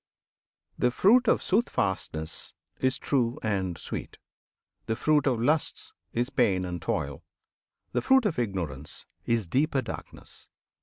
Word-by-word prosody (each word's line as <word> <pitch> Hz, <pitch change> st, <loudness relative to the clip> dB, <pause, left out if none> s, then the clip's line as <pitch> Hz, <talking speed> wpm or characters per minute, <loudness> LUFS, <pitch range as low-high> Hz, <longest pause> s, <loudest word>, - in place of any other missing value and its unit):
The 125 Hz, -, +4 dB
fruit 225 Hz, -, +5 dB
of -, -, +3 dB
Soothfastness 95 Hz, -, -1 dB, 0.3 s
is 130 Hz, 0 st, +2 dB
true 125 Hz, -4 st, 0 dB
and 95 Hz, -5 st, -1 dB
sweet; -, -, -6 dB, 0.7 s
The 110 Hz, -, 0 dB
fruit 150 Hz, +2 st, +2 dB
of 125 Hz, -4 st, +2 dB
lusts 150 Hz, +6 st, 0 dB, 0.2 s
is 120 Hz, +3 st, -1 dB
pain 100 Hz, -9 st, +2 dB
and 90 Hz, -2 st, -4 dB
toil; 80 Hz, -10 st, -2 dB, 0.7 s
the -, -, 0 dB
fruit 265 Hz, -2 st, +4 dB
Of 170 Hz, -10 st, 0 dB
Ignorance 85 Hz, -, -3 dB, 0.2 s
is 115 Hz, -3 st, +1 dB
deeper 135 Hz, -, +1 dB
darkness. -, -, -9 dB
115 Hz, 125 wpm, -28 LUFS, 95-145 Hz, 0.7 s, fruit